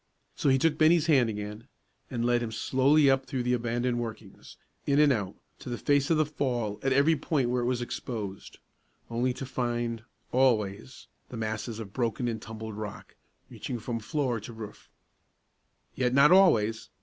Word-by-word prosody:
So -, -, +1 dB
he 135 Hz, -, +5 dB
took 155 Hz, +2 st, +1 dB
Bennie's 160 Hz, +1 st, +5 dB
hand 135 Hz, -8 st, +4 dB
again, 105 Hz, +2 st, -6 dB, 0.4 s
and 120 Hz, -3 st, -2 dB
led 120 Hz, 0 st, +2 dB
him 115 Hz, -2 st, -3 dB
slowly 135 Hz, +6 st, +3 dB
up 135 Hz, 0 st, +2 dB
through 130 Hz, -2 st, -2 dB
the 125 Hz, +1 st, +1 dB
abandoned 120 Hz, 0 st, -1 dB
workings, 110 Hz, -4 st, -8 dB, 0.3 s
in 140 Hz, -, +3 dB
and 150 Hz, -2 st, +5 dB
out, 100 Hz, -4 st, -3 dB, 0.2 s
to -, -, -8 dB
the 120 Hz, -, -3 dB
face 145 Hz, +1 st, +1 dB
of 165 Hz, -, +3 dB
the 155 Hz, -, +3 dB
fall 120 Hz, -8 st, -2 dB
at 135 Hz, -, 0 dB
every 140 Hz, +5 st, +4 dB
point 140 Hz, -4 st, 0 dB
where 125 Hz, 0 st, +1 dB
it 120 Hz, -, -1 dB
was 125 Hz, -1 st, 0 dB
exposed, 105 Hz, -5 st, -6 dB, 0.5 s
only 120 Hz, +2 st, +1 dB
to 135 Hz, -, -5 dB
find, 120 Hz, -2 st, -2 dB, 0.3 s
always, 120 Hz, -3 st, 0 dB, 0.2 s
the 125 Hz, -, -7 dB
masses 110 Hz, 0 st, -4 dB
of 105 Hz, -3 st, -8 dB
broken 120 Hz, 0 st, -1 dB
and 115 Hz, -2 st, -3 dB
tumbled 110 Hz, -1 st, -7 dB
rock, 105 Hz, -2 st, -8 dB, 0.3 s
reaching 125 Hz, -, -6 dB
from 115 Hz, +1 st, -4 dB
floor 130 Hz, 0 st, -1 dB
to 115 Hz, +3 st, -9 dB
roof. 110 Hz, -2 st, -10 dB, 1.0 s
Yet 125 Hz, -1 st, 0 dB
not 140 Hz, +3 st, +6 dB
always! 115 Hz, -, +4 dB
120 Hz, 175 wpm, -28 LUFS, 110-135 Hz, 1.0 s, not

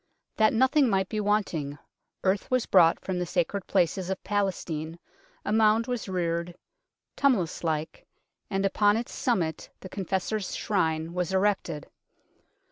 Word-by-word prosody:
That 215 Hz, 0 st, +4 dB
nothing 260 Hz, +3 st, +3 dB
might 190 Hz, -2 st, +1 dB
be 215 Hz, -, -2 dB
wanting, 190 Hz, -9 st, 0 dB, 0.5 s
earth 190 Hz, +1 st, +1 dB
was 255 Hz, -2 st, +1 dB
brought 170 Hz, -3 st, +5 dB
from 185 Hz, -2 st, -3 dB
the 180 Hz, -, -1 dB
sacred 180 Hz, +3 st, -1 dB
places 185 Hz, 0 st, +1 dB
of 190 Hz, -, -3 dB
Palestine, 175 Hz, -5 st, -2 dB, 0.5 s
a 210 Hz, -, 0 dB
mound 220 Hz, +1 st, +4 dB
was 245 Hz, -5 st, -3 dB
reared, 170 Hz, -1 st, -2 dB, 0.6 s
tumul 260 Hz, -9 st, +3 dB
ous 165 Hz, -, -8 dB
like, 160 Hz, -1 st, -3 dB, 0.4 s
and 195 Hz, 0 st, 0 dB
upon 205 Hz, +2 st, +3 dB
its 235 Hz, -, -4 dB
summit 175 Hz, -, -1 dB
the 185 Hz, -, -9 dB
Confessor's 195 Hz, +2 st, -2 dB
Shrine 160 Hz, -4 st, 0 dB
was 180 Hz, +1 st, -2 dB
erected. 190 Hz, -6 st, 0 dB
190 Hz, 140 wpm, -27 LUFS, 170-210 Hz, 0.6 s, brought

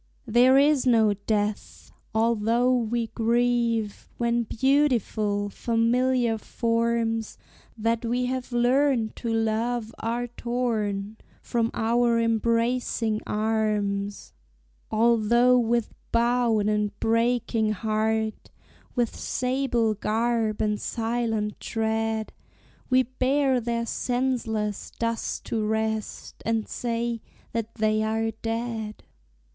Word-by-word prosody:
There 245 Hz, +3 st, +5 dB
is 285 Hz, -2 st, +4 dB
no 220 Hz, -4 st, +4 dB
death! 205 Hz, +1 st, -3 dB, 0.2 s
although 230 Hz, +2 st, +2 dB
we 235 Hz, -1 st, 0 dB
grieve 235 Hz, -2 st, 0 dB
When 235 Hz, 0 st, +1 dB
beautiful, 230 Hz, -6 st, +1 dB
familiar 235 Hz, +1 st, +1 dB
forms 230 Hz, 0 st, -1 dB, 0.4 s
That 230 Hz, +1 st, 0 dB
we 245 Hz, +2 st, 0 dB
have 255 Hz, 0 st, -3 dB
learned 245 Hz, -1 st, +2 dB
to 235 Hz, -, -3 dB
love 225 Hz, +1 st, -1 dB
are 235 Hz, +2 st, -1 dB
torn 220 Hz, -4 st, -2 dB, 0.3 s
From 230 Hz, -2 st, 0 dB
our 235 Hz, +1 st, +2 dB
embracing 230 Hz, 0 st, +1 dB
arms; 210 Hz, -2 st, -1 dB, 0.6 s
Although 235 Hz, +2 st, +4 dB
with 235 Hz, -1 st, 0 dB, 0.2 s
bowed 235 Hz, -2 st, +2 dB
and 210 Hz, -1 st, -1 dB
breaking 230 Hz, -1 st, +1 dB
heart, 220 Hz, +1 st, -1 dB, 0.5 s
With 240 Hz, -3 st, 0 dB
sable 250 Hz, -3 st, 0 dB
garb 220 Hz, +1 st, 0 dB
and 210 Hz, -1 st, -1 dB
silent 225 Hz, -2 st, -2 dB
tread, 220 Hz, 0 st, -2 dB, 0.6 s
We 255 Hz, 0 st, +4 dB
bear 260 Hz, +1 st, +1 dB
their 235 Hz, 0 st, -1 dB
senseless 235 Hz, -5 st, -1 dB
dust 230 Hz, 0 st, -2 dB
to 225 Hz, -2 st, -1 dB
rest, 220 Hz, 0 st, -3 dB
And 225 Hz, 0 st, -1 dB
say 235 Hz, -1 st, -2 dB, 0.3 s
that 230 Hz, 0 st, -3 dB
they 215 Hz, -1 st, +1 dB
are 220 Hz, +1 st, 0 dB
"dead." 225 Hz, -1 st, -4 dB
230 Hz, 95 wpm, -26 LUFS, 220-240 Hz, 0.6 s, There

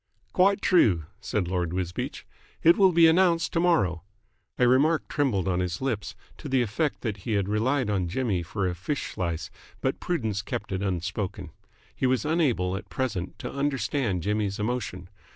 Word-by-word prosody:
"Quite 195 Hz, +2 st, +3 dB
true," 100 Hz, -, +4 dB
said 100 Hz, -5 st, -2 dB
Lord 90 Hz, -2 st, -1 dB
Wisbeach. 90 Hz, -1 st, -4 dB, 0.4 s
"It 170 Hz, -, +7 dB
will 190 Hz, -2 st, +5 dB
be 170 Hz, -1 st, +6 dB
announced 170 Hz, 0 st, +3 dB
to 165 Hz, -, +2 dB
morrow." 150 Hz, -, +2 dB, 0.6 s
A 125 Hz, -, +4 dB
remark 150 Hz, +6 st, +3 dB
trembled 120 Hz, -, 0 dB
on 90 Hz, -1 st, +1 dB
his 90 Hz, -1 st, -2 dB
lips, 110 Hz, -6 st, -3 dB, 0.2 s
to 150 Hz, -, -7 dB
the 130 Hz, -2 st, +3 dB
effect 145 Hz, +7 st, -1 dB
that 110 Hz, -4 st, -3 dB
he 105 Hz, +3 st, -1 dB
relied 110 Hz, +7 st, +1 dB
on 95 Hz, -4 st, 0 dB
Jimmy 100 Hz, -1 st, -1 dB
for 95 Hz, +3 st, -2 dB
a 90 Hz, -, -1 dB
fish 115 Hz, -, -3 dB
slice, 85 Hz, -3 st, -3 dB, 0.3 s
but -, -, -1 dB
prudence 110 Hz, -, -1 dB
kept 115 Hz, 0 st, -5 dB
it 95 Hz, 0 st, -2 dB
unspoken. 95 Hz, -1 st, -3 dB, 0.4 s
He 130 Hz, -, +1 dB
was 130 Hz, +2 st, +1 dB
unable 130 Hz, -, +1 dB
at 95 Hz, -, -7 dB
present 100 Hz, -9 st, -3 dB
to -, -, -6 dB
understand 135 Hz, -, -1 dB
Jimmy's 105 Hz, -1 st, -1 dB
emotion. 105 Hz, -5 st, -3 dB
105 Hz, 170 wpm, -27 LUFS, 90-140 Hz, 0.6 s, It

